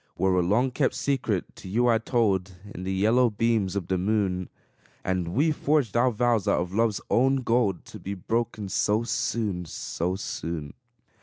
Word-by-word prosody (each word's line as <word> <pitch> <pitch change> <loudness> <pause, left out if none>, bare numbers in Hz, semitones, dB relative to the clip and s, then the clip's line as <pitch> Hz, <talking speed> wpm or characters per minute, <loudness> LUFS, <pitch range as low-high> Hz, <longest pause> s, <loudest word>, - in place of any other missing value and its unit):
Where 95 -1 +2
a 90 - +3
long 110 +9 +2
kept 130 +1 0
secret 125 -9 -1
to 95 - -9
you 120 +5 +2
I 115 -2 +4
told, 100 -6 0 0.2
In 90 - -7
the 95 +1 -3
yellow 110 +6 +3
beams 105 -3 0
of 100 -4 -2
the 95 0 -1
moon, 95 -2 0 0.5
And 90 -2 -1
we 155 +5 +3
forged 145 -7 +1
our 125 +2 +4
vows 120 -2 +1
out - - +3
of 90 +1 -3
love's 110 -1 +1
own 135 +2 +3
gold, 115 -6 +1
To - - -10
be 100 +1 -5
broken 110 +1 -2
so 105 +4 +1
soon, 105 -6 -1
so 85 +3 -3
soon! 80 -5 -5
105 Hz, 175 wpm, -26 LUFS, 95-120 Hz, 0.5 s, I